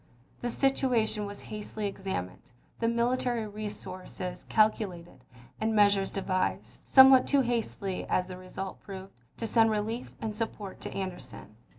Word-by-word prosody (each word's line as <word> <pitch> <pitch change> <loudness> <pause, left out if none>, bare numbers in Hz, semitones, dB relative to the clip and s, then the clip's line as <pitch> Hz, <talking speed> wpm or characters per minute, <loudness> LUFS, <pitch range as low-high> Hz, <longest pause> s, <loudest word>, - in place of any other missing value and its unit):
The 240 - -2
situation 235 -5 +1
was 205 0 -7
hastily 210 0 -5
examined, 190 - -4 0.4
the 230 - +1
military 235 0 +1
resources 185 -3 -6
calcu 215 0 +4
lated, 170 -6 -12 0.4
and 220 0 0
measures 200 -2 +4
devised, 185 -1 -2
somewhat 265 -1 +8
too 280 -1 +4
hastily 225 -6 -2
as 180 - +2
the 185 0 -8
result 185 +1 -6
proved, 190 -1 -9 0.2
to 230 - -3
send 225 0 +4
relief 220 +3 -2
and 215 -1 -3
support 215 -3 -5
to - - -5
Anderson. 180 - -6
210 Hz, 135 wpm, -29 LUFS, 190-230 Hz, 0.4 s, somewhat